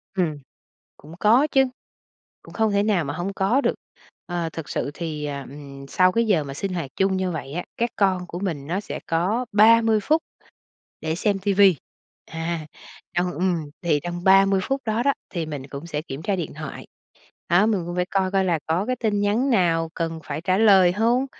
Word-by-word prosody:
Ừm, 170 -6 0 0.6
cũng 155 +3 -13
có 235 +7 +5
chứ, 270 -1 +5 0.8
cũng - - -14
không 220 -1 +1
thể 200 0 +2
nào 205 -5 +2
mà 145 - -3
hông 175 +5 -3
có 200 +8 +2
được. - - +1 0.5
Ờ, 175 -2 -3
thực 165 -2 -7
sự 140 - -2
thì, 155 -2 -4
ờ, 145 -1 -4
ừm, 140 -1 -10
sau 185 +6 +3
cái 230 +4 +1
giờ 190 -8 +2
mà 140 -1 -7
sinh 190 +6 -4
hoạt 165 -7 -4
chung 190 0 +1
như 185 -1 -1
vậy 145 -4 -6
á, 175 +2 -3
các 235 +1 +1
con 185 -3 +1
của 175 - -6
mình 160 -8 -3
nó 180 +5 -1
sẽ 205 - -6
có 190 +10 0
30 225 +1 +5
phút 315 +7 +2 0.8
để 160 0 -2
xem 200 +3 0
TV, 200 0 0 0.7
à, 165 -1 -3 0.5
trong 180 +1 0
ừm, 175 -2 -1 0.2
thì 155 -4 +2
trong 175 0 -5
30 195 0 +5
phút 270 +6 -1
đó 220 0 0
đó, 280 +2 +3 0.2
thì 170 -4 -3
mình 145 -3 -6
cũng 140 +4 -8
sẽ 150 -3 -3
kiểm 140 -1 -7
tra 200 +1 0
điện 170 -6 -4
thoại, 155 -1 -8 0.6
đó, 175 +4 +5
mình 210 -5 +1
cũng 175 +1 -5
phải 180 0 +1
coi 190 0 0
coi 195 -1 +2
là 170 -3 +1
có 170 +5 0
cái 255 +2 -1
tin 215 -4 0
nhắn 215 +7 +1
nào 170 -8 +2
cần 165 -1 -3
phải - - -5
trả 185 +2 +1
lời 195 -4 +6
hông? 230 +6 +2
185 Hz, 210 wpm, -23 LUFS, 165-205 Hz, 0.8 s, lời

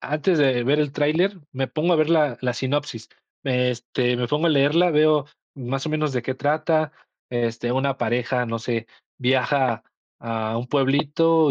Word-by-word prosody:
antes 155 +4 0
de 130 -4 +3
ver 145 +3 +2
el 145 -2 -1
tráiler, 170 +7 +1
me 135 -1 -2
pongo 160 +6 0
a - - +4
ver 155 +1 +2
la 150 -6 +3
la 125 -1 -1
sinopsis, 130 -2 -3 0.4
me, 125 -2 +1
este, 125 +1 -1
me 120 0 -1
pongo 150 +3 +1
a - - +4
leerla, 155 +5 +3
veo 150 -2 +3 0.3
más 135 +2 -4
o - - -2
menos 155 -2 -1
de 125 - -1
qué 130 +2 -3
trata, 155 +2 0 0.4
este, 120 0 -2
una 135 +1 0
pareja, 120 +1 0
no 115 0 -3
sé, 115 -1 -3 0.3
viaja 130 -1 +1 0.3
a 115 -1 -3
un 120 - -4
pueblito 145 +3 +2
135 Hz, 175 wpm, -23 LUFS, 125-150 Hz, 0.4 s, a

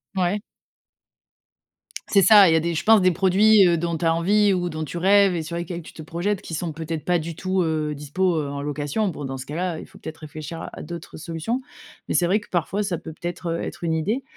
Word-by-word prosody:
Ouais. 190 +3 0 1.7
C'est 200 - +4
ça, 205 -4 +8
il 160 - +4
y - - +4
a - - +4
des 170 +1 -1
je 155 - -2
pense 220 -2 +6
des 185 0 +4
produits, 195 +3 +5
heu, 170 -1 +3
dont 170 0 -2
tu 165 - -3
as 165 - +4
envie 200 +4 +3
ou 175 -1 -1
dont 155 -1 -4
tu 165 +3 -6
rêves 195 +1 +4
et 165 - -2
sur 170 +2 -6
lesquels 175 0 -5
tu - - -13
te - - -10
projettes, 175 +5 -2
qui - - -9
sont 170 +1 -3
peut 160 +1 -7
être, 160 -2 -4
pas 175 -1 +2
du 165 +1 -6
tout, 185 +2 -1
heu, 155 -2 -1
dispo, 165 +6 -1
heu, 150 -2 -1
en 140 0 -5
location. 145 +8 -2
Bon 145 -4 -6
dans 135 0 -5
ce 130 - -7
cas 150 +2 -7
là, 175 -2 -2
heu, - - -7
il - - -10
faut - - -17
peut-être 160 0 -8
réfléchir 155 +1 -8
à - - -6
à - - -6
d'autres 170 -1 -8
solutions, 165 +10 -3 0.5
mais - - -2
c'est 175 - +3
vrai 205 +4 +2
que 210 - -16
parfois, 185 +4 -1
ça 190 -4 -2
peut 160 0 -9
peut-être, 175 +2 -6
heu, 165 - -2
être - - -6
une 165 -1 0
idée, 210 - -1
170 Hz, 265 wpm, -23 LUFS, 160-190 Hz, 1.7 s, ça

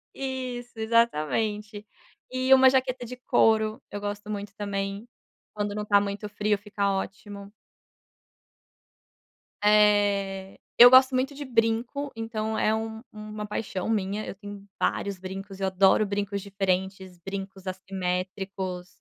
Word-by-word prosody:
Isso, 255 -2 -4
exatamente. 215 -1 0 0.4
E 255 +1 +3
uma 265 0 +8
jaqueta 260 -1 0
de 250 +2 -8
couro, 220 -3 +2
eu 205 - -5
gosto 205 +1 -5
muito 200 -1 -5
também, 200 +1 -4 0.5
quando 205 -1 -2
não 210 - -3
tá 205 -1 +5
muito 200 +1 -4
frio, 210 0 0
fica 200 -1 -1
ótimo. 200 +1 -6 2.1
Eh, 205 -2 +3 0.2
eu 245 +1 +11
gosto 260 +1 +7
muito 270 +2 0
de 285 0 -6
brinco, 240 +4 0
então, 220 -1 -3
é 215 - +2
um 220 0 -4
uma 215 0 -7
paixão 205 -2 -4
minha, 210 -1 -1
eu - - -6
tenho 205 0 -10
vários 200 -2 -1
brincos, 195 +1 -7
eu 195 - 0
adoro 190 +2 +4
brincos 200 0 -2
diferentes, 190 -2 -2
brincos 195 +1 -7
assimétricos. 185 0 -4
205 Hz, 125 wpm, -26 LUFS, 195-225 Hz, 2.1 s, eu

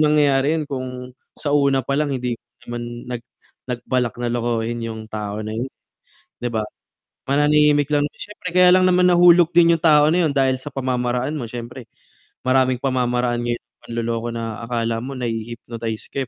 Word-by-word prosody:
mangyayari 150 -1 +3
'yun 155 - -2
kung 130 -2 -4 0.5
sa 145 - -3
una 140 -3 +3
palang 140 +1 0
hindi 125 -2 -2 0.3
naman 120 0 -6
nag 120 -2 -4 0.5
nagbalak 125 -1 -1
na 120 - -1
lokohin 120 -1 -1
yung 110 -1 -6
tao 105 -1 -4
na 110 0 -5
yun, 125 +3 -2 0.7
'di 120 - 0
ba? 110 -2 -1 0.7
Mananahimik 145 0 +4
lang 145 0 +3
'yon - - -25
syempre 205 -3 -7
kaya 180 0 +7
lang 185 0 +4
naman 180 0 +4
nahulog 175 -1 +6
din 170 -1 +6
yung 160 - -16
tao 150 -2 +6
na 180 - +2
'yun 150 - 0
dahil 130 -1 +2
sa 145 - -7
pamamaraan 125 +1 -1
mo 120 -6 -4
syempre, 120 +1 -8 0.6
maraming 130 0 +3
pamamaraan 125 -2 0
ngayon 120 0 -1
ng 120 - -63 0.2
panloloko 115 0 -2
na 115 -1 -5
akala 115 -1 -1
mo 135 +3 -6
nahi-hypnotize 115 -1 -5
ka, 135 - -1
125 Hz, 170 wpm, -21 LUFS, 120-145 Hz, 0.7 s, kaya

